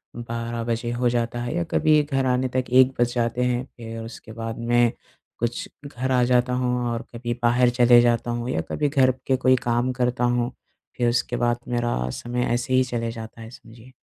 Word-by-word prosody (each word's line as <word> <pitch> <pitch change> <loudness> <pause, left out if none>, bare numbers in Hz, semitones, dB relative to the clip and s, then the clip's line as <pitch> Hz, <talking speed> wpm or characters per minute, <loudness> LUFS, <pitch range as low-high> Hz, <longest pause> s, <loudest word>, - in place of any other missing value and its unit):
12 115 0 -4
बजे 120 0 -2
हो 120 0 +1
जाता 120 0 -1
है 120 +6 -3
या 175 - 0
कभी 155 -1 +4
घर 135 -2 -1
आने 130 0 +1
तक 130 -1 +1
1 130 +1 +6
बज 120 0 +2
जाते 120 +1 0
हैं। 125 0 0
फिर 115 -1 -7
उसके 115 0 -10
बाद 115 0 -5
में, 120 0 +3 0.5
कुछ 120 0 -2 0.2
घर 130 -1 -3
आ 125 -1 +3
जाता 125 0 +2
हूँ 125 0 0 0.2
और 115 - -3
कभी 120 0 -3
बाहर 120 +1 +4
चले 120 0 +6
जाता 120 0 +1
हूँ 120 +1 -3
या 80 - 0
कभी 150 -1 0
घर 130 -2 +4 0.2
के 130 - +3
कोई 130 0 +4
काम 120 +1 +1
करता 125 0 0
हूँ। 120 0 +1 0.5
फिर 120 -1 +2
उसके 120 0 0
बाद 120 0 +1
मेरा 120 - -1
समय 120 - -3
ऐसे 125 +1 -1
ही 130 0 +5
चले 115 -2 -3
जाता 115 0 -9
है, 110 - -9
समझिए। 115 +1 -15
120 Hz, 205 wpm, -24 LUFS, 120-125 Hz, 0.5 s, 1